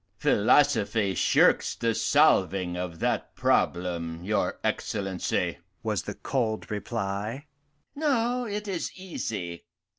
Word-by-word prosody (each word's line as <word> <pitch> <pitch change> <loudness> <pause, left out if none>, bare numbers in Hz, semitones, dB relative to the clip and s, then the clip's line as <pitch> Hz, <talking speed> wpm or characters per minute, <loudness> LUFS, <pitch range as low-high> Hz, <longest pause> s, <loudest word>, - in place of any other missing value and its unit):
"Philosophy 110 -4 +3
shirks - - +3
the 115 -1 0
solving 95 - +3
of 90 -2 -4
that - - -1
problem, 85 -2 0
your 105 +3 0
Excellency," 95 -2 -1 0.2
was - - 0
the - - -6
cold 115 -6 -2
reply. 105 +4 -3 0.5
"No, 250 -4 +1
it 210 -1 -4
is 185 -4 -3
easy. 110 - -5
110 Hz, 100 wpm, -27 LUFS, 90-150 Hz, 0.5 s, Philosophy